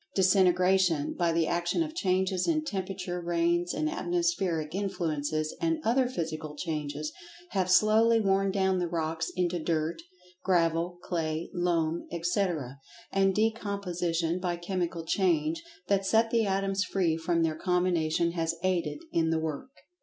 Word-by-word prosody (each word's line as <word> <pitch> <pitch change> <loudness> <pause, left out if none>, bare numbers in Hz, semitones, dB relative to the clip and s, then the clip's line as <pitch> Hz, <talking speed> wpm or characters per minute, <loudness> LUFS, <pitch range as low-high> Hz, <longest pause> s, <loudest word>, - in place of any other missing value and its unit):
Disintegration, 185 -4 +3
by 170 -1 +1
the 165 0 +2
action 175 - 0
of 310 -1 -6
changes 185 - 0
in 310 -2 +1
temperature, 185 -5 -4
rains 170 +1 +1
and 310 - -1
atmospheric 315 - -1
influences, 160 -6 -2
and 330 -1 +1
other 250 +3 +3
Physical 155 -7 -4
Changes, 150 -2 -4 0.4
have 185 -2 0
slowly 220 +5 +5
worn 195 -1 +2
down 190 -1 +1
the 175 - 0
rocks 160 -1 -2
into 180 -1 0
"dirt," 165 +1 -1 0.4
gravel, 170 -1 +1
clay, 160 -1 -2
loam, 170 -2 0
etc. 170 - -1 0.3
And 195 -1 +2
Decomposition 180 -6 -1
by 180 -1 -1
Chemical 175 -1 -3
Change 165 -3 +1 0.3
that 195 0 +2
set 225 +3 +2
the 230 -3 +2
atoms 195 0 0
free 180 -4 0
from 165 +1 0
their 160 -1 0
combinations 170 -2 +1
has 165 -1 -1
aided 185 -2 0
in 160 -1 +1
the 165 - +1
work. 160 - -4
175 Hz, 140 wpm, -29 LUFS, 165-195 Hz, 0.4 s, slowly